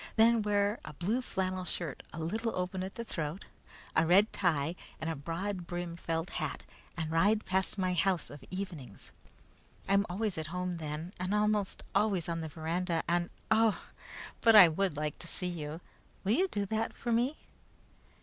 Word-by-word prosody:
Then 230 0 +6
wear 205 +1 +1
a 150 - -8
blue 205 - 0
flannel 185 -5 -2
shirt 170 -5 -4
a - - -8
little 220 +8 -1
open 185 +1 -2
at 190 +1 -5
the 235 - -4
throat, 165 -4 -4 0.5
a 160 - +4
red 195 +5 +5
tie, 160 -4 +1 0.3
and 160 +1 -1
a - - -3
broad 170 +5 -3
brimmed 175 -1 -4
felt 165 +1 -2
hat, - - -2 0.3
and 160 -2 -2
ride 205 +7 +3
past 190 +2 +1
my 185 -1 +1
house 180 0 +1
of 145 -2 -10
evenings. 175 - -6 0.8
I'm 200 +1 +3
always 195 -1 -1
at 155 - -4
home 180 +1 -2
then, 155 +3 -5
and 185 +3 0
almost 210 -1 +1
always 200 -4 +2
on 165 -1 -2
the 160 - -4
veranda, 165 +2 -1
and, 175 0 +1 0.2
oh! 220 -1 +4 0.6
but 225 -1 +7
I 185 -5 +11
would 170 -1 0
like 150 -1 -2
to 170 - -7
see 180 - -5
you! 160 -2 -4 0.4
Will 200 - +1
you 365 +11 +4
do 205 - -2
that 220 +3 -1
for 240 - -3
me?" 245 +6 +2
180 Hz, 180 wpm, -32 LUFS, 165-205 Hz, 0.8 s, I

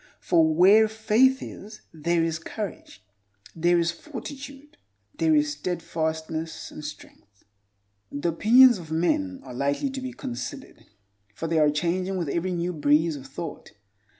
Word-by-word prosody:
For 160 -2 +3
where 195 +7 +6
faith 220 +5 +2
is 210 +2 -10
there 165 +1 0
is 165 -1 -1
courage, 290 - -7 0.5
there 175 +1 +3
is 170 0 +1
fortitude, 280 - -9 0.4
there 160 -1 +3
is 150 0 +2
steadfastness 160 0 -4
and 150 - -9
strength. 105 -8 -12 0.7
The 145 +4 -1
opinions 235 +7 +6
of 165 -3 -11
men 270 - 0
are - - -10
lightly 140 - -1
to 265 0 -5
be 255 0 -5
considered, 265 +2 -7 0.5
for 165 - -5
they 165 0 +1
are 150 -1 +5
changing 180 +5 -1
with 170 -5 -2
every 170 +5 -1
new 175 0 -2
breeze 150 +1 +2
of 135 -2 -9
thought. 145 +3 -8
170 Hz, 145 wpm, -25 LUFS, 160-225 Hz, 0.7 s, where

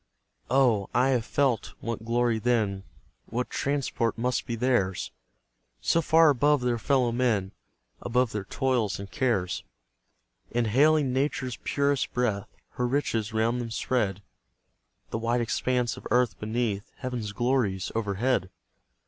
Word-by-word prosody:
Oh, 120 -7 +3
I 125 +2 +4
have 125 -4 +1
felt 135 -5 0
what 115 -1 -5
glory 120 -1 +1
then, 105 -5 0 0.4
What 125 +2 -3
transport 135 -5 -1
must 125 +2 -1
be 115 - -2
theirs! 115 -6 0 0.7
So 165 - +2
far 160 0 +5
above 145 +1 +3
their 120 -1 0
fellow 125 0 +2
men, 115 -6 +1 0.5
Above 125 0 +1
their 105 -2 -4
toils 125 -4 0
and 100 0 -8
cares; 120 - 0 0.9
Inhaling 130 +5 +3
Nature's 130 -2 -1
purest 140 -1 0
breath, 110 -5 0 0.2
Her 125 - -1
riches 115 -5 -1
round 115 +2 +1
them 115 - -5
spread, 105 -4 -1 0.9
The 110 - -2
wide 120 +2 +1
expanse 125 +1 0
of - - -8
earth 125 -6 +2
beneath, 110 -2 -2
Heaven's 125 -5 -4
glories 115 -4 0
overhead! 110 0 0
120 Hz, 130 wpm, -27 LUFS, 110-130 Hz, 0.9 s, far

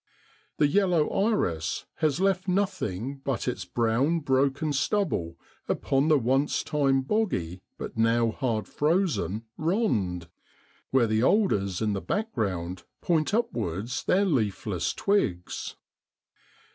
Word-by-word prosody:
The 150 - +4
yellow 175 -1 +2
iris 90 - 0
has 155 -2 +1
left 195 -1 +1
nothing 140 - -1
but 135 -2 -3
its 125 - -2
brown 125 +8 +1
broken 140 +2 +1
stubble 135 - 0 0.3
upon 135 +2 +1
the 155 -2 +5
once 135 +3 +1
time 135 -3 +1
boggy, 115 - -1 0.2
but - - -6
now 115 0 +3
hard 115 -4 -2
frozen 150 - 0
* - - -54
rond,' 100 - 0 0.6
where 130 -3 +3
the 110 0 +1
alders 105 - +2
in 105 -1 +1
the 95 - -2
background 100 - -2 0.2
point 160 -3 +1
upwards 120 - -2
their 195 +2 +3
leafless 105 - 0
twigs. 100 - -1
135 Hz, 120 wpm, -27 LUFS, 105-170 Hz, 0.6 s, the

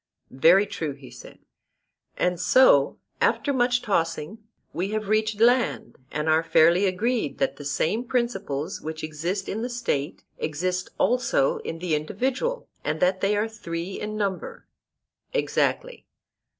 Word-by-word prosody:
Very 170 +9 +5
true, 160 -7 -4
he 135 -3 -14
said. 125 - -12 0.8
And 180 -1 0
so, 180 - +5 0.2
after 285 - +2
much 245 -1 +2
tossing, 165 0 -1 0.3
we 180 +4 -2
have 215 -1 -3
reached 215 0 +1
land, 245 +2 +2
and 150 +1 -2
are 160 0 +4
fairly 170 +4 +4
agreed 225 +6 -1
that 270 - -1
the 145 - -8
same 190 - 0
principles 195 - -2
which 160 0 -6
exist 170 +6 -3
in 220 - -3
the 245 - -3
State 230 - -2 0.2
exist 180 +4 -2
also 240 - +2
in 165 - -5
the 170 -1 -2
individual, 255 - -1 0.2
and 155 +1 -2
that 185 +2 +2
they 205 +1 +2
are 210 +2 +1
three 180 -4 -6
in 215 0 -4
number. 195 -3 -3 0.7
Exactly. - - -1
190 Hz, 140 wpm, -25 LUFS, 160-230 Hz, 0.8 s, Very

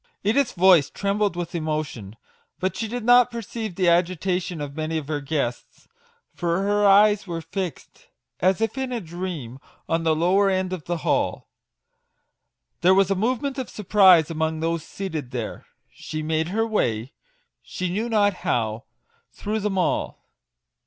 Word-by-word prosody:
Edith's 235 +6 +2
voice 175 -5 +5
trembled 200 -1 -1
with 175 0 -5
emotion, 155 - -4 0.4
but 185 +1 -1
she 225 - -3
did 240 +1 -4
not 245 +1 +6
perceive 225 -4 -6
the 185 -1 +1
agitation 180 0 +1
of 145 -1 -6
many 155 +1 -2
of 150 -3 -5
her 150 -1 -2
guests, 140 -4 -4 0.5
for 175 +1 -1
her 205 0 +2
eyes 205 0 +5
were 170 -1 -3
fixed, 180 +1 -6 0.3
as 185 +3 +2
if 225 +4 -1
in 265 -1 -3
a 245 - -2
dream, 170 - -6 0.3
on 165 0 0
the 160 -1 +2
lower 190 +5 +3
end 185 -1 -1
of 175 -5 -6
the 175 0 -2
hall. - - 0 1.3
There 185 +2 +5
was 195 0 +3
a - - +3
movement 255 +7 -1
of 255 - -4
surprise 190 -6 +5
among 160 0 -1
those 165 0 -1
seated 160 -9 -5
there: 120 -4 -6 0.3
she 155 0 -6
made 160 +1 0
her 220 +5 0
way, 125 - -1 0.5
she 185 - -4
knew 220 +6 -2
not 205 -3 +3
how, 110 -2 -1 0.5
through 215 +1 -3
them 205 -2 -2
all. 180 - -1
180 Hz, 160 wpm, -24 LUFS, 160-205 Hz, 1.3 s, not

